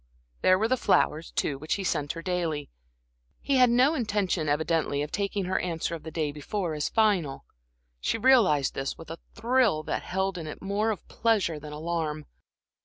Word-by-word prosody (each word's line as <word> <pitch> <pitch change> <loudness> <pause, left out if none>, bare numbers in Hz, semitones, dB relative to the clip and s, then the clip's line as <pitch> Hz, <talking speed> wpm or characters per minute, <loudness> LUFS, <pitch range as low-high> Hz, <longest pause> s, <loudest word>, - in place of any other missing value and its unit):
There 185 - +5
were 220 +3 +1
the 255 +2 +2
flowers, 165 -7 +2
too, 140 -2 -1
which 155 +2 -1
he 200 - -4
sent 150 -5 -1
her 165 0 -8
daily. 165 -5 -2 0.7
He 275 - +1
had 250 -1 +6
no 255 +6 +4
intention, 205 - 0
evidently, 150 -1 0
of 150 - -6
taking 200 0 -1
her 185 +1 0
answer 170 -1 -2
of 165 - -5
the 160 - -7
day 155 -2 -2
before 165 +4 -3
as 150 -1 -1
final. 195 -11 +1 0.5
She - - 0
realized 210 - +4
this, 135 0 -3
with 165 -1 -10
a 165 - -7 0.2
thrill 230 -8 +2
that - - -2
held 190 0 -2
in 160 - -6
it 155 - -7
more 200 +3 0
of 215 - -4
pleasure 205 -9 +1
than 150 0 -9
alarm. 155 -1 -3
170 Hz, 185 wpm, -27 LUFS, 155-210 Hz, 0.7 s, had